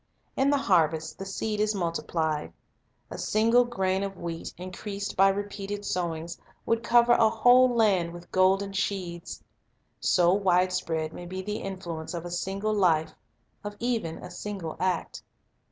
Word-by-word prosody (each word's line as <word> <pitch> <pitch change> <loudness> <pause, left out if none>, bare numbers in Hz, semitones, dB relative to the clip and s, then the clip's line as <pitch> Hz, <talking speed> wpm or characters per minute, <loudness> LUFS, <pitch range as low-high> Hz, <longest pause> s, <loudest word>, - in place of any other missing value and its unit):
In 270 +1 +2
the 285 - +3
harvest 160 - +1
the 195 - -5
seed 210 +2 -3
is 215 0 +1
multiplied. 160 - -2 0.6
A - - -6
single 230 +3 +3
grain 190 -6 -1
of 195 -1 -4
wheat, 170 -1 -5
increased 200 +3 -6
by 195 +1 +6
repeated 205 0 -4
sowings, 170 -1 -3 0.3
would 230 0 +1
cover 240 0 +4
a 225 -2 +5
whole 245 +3 +5
land 205 -8 +2
with 175 0 -12
golden 195 +1 +2
sheaves. 185 -3 -3 0.6
So 175 -1 +3
wide 185 -2 +2
spread 160 -3 -2
may 175 - -8
be 185 +1 -5
the 210 +2 -3
influence 175 -4 -6
of 170 0 -5
a 175 - -6
single 195 +4 -2
life, 170 -6 +2 0.5
of 205 0 -6
even 230 -9 -1
a 180 - -10
single 180 -3 -5
act. 185 -2 -1
190 Hz, 155 wpm, -27 LUFS, 175-210 Hz, 0.6 s, by